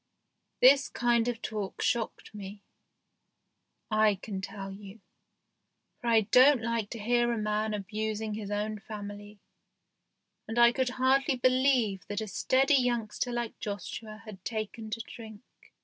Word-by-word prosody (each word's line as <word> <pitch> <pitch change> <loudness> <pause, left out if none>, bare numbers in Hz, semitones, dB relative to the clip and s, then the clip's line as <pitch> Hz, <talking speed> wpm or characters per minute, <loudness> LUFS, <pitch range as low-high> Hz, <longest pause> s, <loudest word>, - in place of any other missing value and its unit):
This 270 +1 +6
kind 240 0 +1
of 240 -2 -3
talk 210 -4 -4
shocked 230 -2 -2
me, 200 0 -9 1.3
I 215 -1 +4
can 195 0 -6
tell 195 0 -6
you, 200 +2 -11 1.0
for 240 - -6
I 225 -1 +5
don't 250 +4 +5
like 230 -3 -1
to 230 - -6
hear 240 +2 +2
a 235 - -1
man 215 0 -1
abusing 215 +1 -3
his 210 -1 -5
own 210 +1 -2
family, 205 -1 -8 1.1
and 225 - -5
I 235 0 +7
could 260 0 0
hardly 260 +2 +2
believe 255 -7 +2
that 205 - -3
a 220 - -4
steady 265 +7 +2
youngster 240 0 -1
like 240 -1 -4
Joshua 215 +1 -6
had 195 -4 -10
taken 220 0 -4
to 225 +2 -3
drink. 220 -1 -11
220 Hz, 140 wpm, -29 LUFS, 210-240 Hz, 1.3 s, I